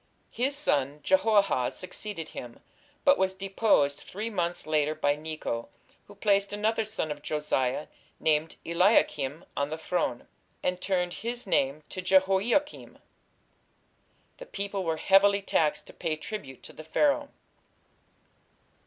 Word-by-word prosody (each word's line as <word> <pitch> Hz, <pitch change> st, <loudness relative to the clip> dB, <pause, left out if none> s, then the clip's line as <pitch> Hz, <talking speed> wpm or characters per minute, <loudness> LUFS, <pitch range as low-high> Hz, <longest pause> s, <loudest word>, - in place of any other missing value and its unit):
" -, -, -40 dB
His 265 Hz, +4 st, 0 dB
son, 145 Hz, -, 0 dB
Jehoahaz, 190 Hz, -, +3 dB
succeeded 185 Hz, -1 st, -5 dB
him, 120 Hz, -1 st, -9 dB, 0.5 s
but 280 Hz, -1 st, +6 dB
was 190 Hz, 0 st, +1 dB
deposed 190 Hz, -7 st, +2 dB
three 215 Hz, +4 st, -6 dB
months 175 Hz, -3 st, -1 dB
later 155 Hz, 0 st, +1 dB
by 145 Hz, -2 st, +1 dB
Necho, 150 Hz, -7 st, -4 dB, 0.4 s
who 205 Hz, -, -14 dB
placed 200 Hz, -1 st, +2 dB
another 220 Hz, +2 st, 0 dB
son 205 Hz, -8 st, -2 dB
of 145 Hz, 0 st, -6 dB
Josiah, 150 Hz, -3 st, -1 dB, 0.3 s
named 155 Hz, 0 st, +1 dB
Eliakim, 165 Hz, -4 st, +2 dB
on 140 Hz, 0 st, -1 dB
the 155 Hz, -, -4 dB
throne, 160 Hz, -7 st, -2 dB, 0.4 s
"and 180 Hz, 0 st, -1 dB
turned 180 Hz, -2 st, 0 dB
his 240 Hz, +2 st, -4 dB
name 145 Hz, -5 st, +1 dB
to 185 Hz, -, -5 dB
Jehoiakim". 195 Hz, +10 st, +2 dB, 1.4 s
The -, -, -10 dB
people 200 Hz, -1 st, -3 dB
were 165 Hz, -2 st, -1 dB
heavily 200 Hz, +3 st, +4 dB
taxed 155 Hz, -5 st, +1 dB
to -, -, -13 dB
pay 160 Hz, -2 st, -2 dB
tribute 155 Hz, -, -7 dB
to -, -, -11 dB
the 155 Hz, -, -10 dB
Pharaoh. 285 Hz, -, +1 dB
180 Hz, 135 wpm, -28 LUFS, 150-205 Hz, 1.4 s, but